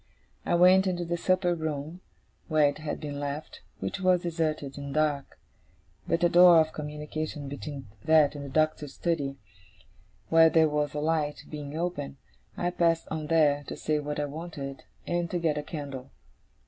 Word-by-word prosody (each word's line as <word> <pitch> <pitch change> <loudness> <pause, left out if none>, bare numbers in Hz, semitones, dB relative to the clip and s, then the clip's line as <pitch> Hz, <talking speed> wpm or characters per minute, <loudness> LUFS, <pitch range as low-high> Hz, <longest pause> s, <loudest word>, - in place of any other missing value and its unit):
I - - +3
went 185 +2 +6
into 175 -1 -1
the 170 +1 -1
supper 185 +1 +1
room 160 +1 -4 0.5
where 155 -3 +4
it 145 +1 -3
had 155 -1 -4
been 145 -2 -5
left, 145 +2 -5 0.2
which - - -3
was 185 -2 +3
deserted 155 -5 -2
and 140 -1 -6
dark. 150 -2 0 0.7
But 170 - 0
a 175 - +5
door 175 -1 +8
of 160 0 +1
communication 150 0 -5
between 140 -1 -6 0.2
that 155 -3 +5
and 145 -1 -7
the 140 - -7
Doctor's 155 -1 0
study, 145 -5 -1 0.9
where 165 0 +7
there 160 0 +4
was 150 0 -1
a - - -1
light, 150 -1 -1
being 150 0 -6
open, 160 -5 -3 0.4
I 175 0 0
passed 170 -2 +1
on 155 -1 -3
there, 150 -3 +3
to - - -6
say 155 -1 0
what 150 0 -4
I 145 - 0
wanted, 145 -2 -7 0.2
and 175 -1 -1
to 180 - -1
get 165 -3 +1
a 150 - -2
candle. 140 -4 -7
155 Hz, 175 wpm, -28 LUFS, 145-170 Hz, 0.9 s, door